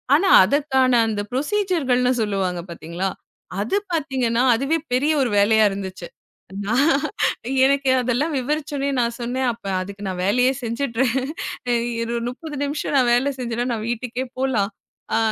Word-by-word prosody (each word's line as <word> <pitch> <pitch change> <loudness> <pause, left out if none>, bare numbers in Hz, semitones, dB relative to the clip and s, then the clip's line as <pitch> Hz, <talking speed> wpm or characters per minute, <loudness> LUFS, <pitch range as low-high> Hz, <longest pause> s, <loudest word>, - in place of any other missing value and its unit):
ஆனா 380 +6 +3 0.2
அதற்கான 265 0 +2
அந்த 210 -2 -1
ப்ரோஸிஸர் 350 +3 0
-கள்னு 250 0 +3
சொல்லுவாங்க 190 -4 -1
பாத்தீங்களா, 170 +3 -4 0.5
அது 220 - -1 0.2
பாத்தீங்கன்னா 260 -7 0
அதுவே 275 +7 0 0.2
பெரிய 280 +5 +2
ஒரு 250 - 0
வேலையா 220 +2 +4
இருந்துச்சு. 190 -3 -6 0.6
நான், 265 +9 +3 0.7
எனக்கு 275 0 +2
அதெல்லாம் 250 +6 0
விவரிச்சவுடனே 285 +1 -2
நான் 235 0 -1
சொன்னேன். 255 +2 -1
அப்ப 230 -2 -18 0.2
அதுக்கு 200 +2 -7
நான் 185 -1 -3
வேலையையே 250 +6 +3
செஞ்சறேன், 235 +1 -1 0.9
ஒரு 235 +1 -3
30 295 +4 -8
நிமிஷம் 290 0 -2
நான் 250 -2 +3
வேலை 260 +4 +2
செஞ்சன்னா 240 -1 -2
நான் 220 -1 -4
வீட்டுக்கே 240 +2 -3
போலாம். 230 -6 0 0.4
அ - - +3
245 Hz, 135 wpm, -22 LUFS, 220-275 Hz, 0.9 s, வேலையா